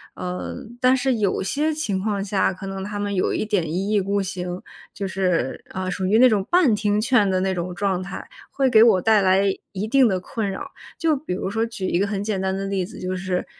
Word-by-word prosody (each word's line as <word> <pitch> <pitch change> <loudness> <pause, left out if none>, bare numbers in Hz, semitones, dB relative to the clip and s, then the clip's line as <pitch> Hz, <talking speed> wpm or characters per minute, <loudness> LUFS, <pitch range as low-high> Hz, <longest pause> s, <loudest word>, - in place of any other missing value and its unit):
呃， 180 0 -5 0.3
但 255 +1 +5
是 260 +1 +1
有 205 -3 0
些 295 +10 0
情 300 -12 -2
况 200 -1 -1
下， 195 -1 +1
可 190 +1 -8
能 195 0 -5
他 205 +1 -5
们 205 0 -2
有 185 - +1
一 - - -1
点 190 -7 -1
一 190 +5 -1
意 210 -2 +3
孤 200 +1 0
行， 180 -1 -5 0.3
就 200 - -4
是， 180 -8 -1
啊， 185 0 -4
属 185 +1 -2
于 210 +3 +4
那 255 +2 +8
种 210 -5 +2
半 345 -9 +4
听 210 0 +1
劝 220 -3 +3
的 185 -1 +1
那 190 0 0
种 180 0 -4
状 190 -1 0
态， 190 - -7 0.2
会 270 -1 +1
给 220 -2 +7
我 225 -5 +6
带 220 0 +4
来 190 0 +4 0.3
一 200 +2 -3
定 265 +2 +5
的 190 -4 0
困 205 +3 -3
扰。 190 - -6 0.3
就 320 -2 +2
比 285 -3 -7
如 190 +1 -3
说 225 +2 0
举 230 -4 -4
一 175 - +1
个 200 - +1
很 200 -1 -2
简 205 -3 -2
单 190 0 -1
的 195 - -3
例 195 -1 -1
子， 185 - -9
就 185 0 -3
是， 185 -1 -2
195 Hz, 260 characters per minute, -23 LUFS, 185-220 Hz, 0.3 s, 那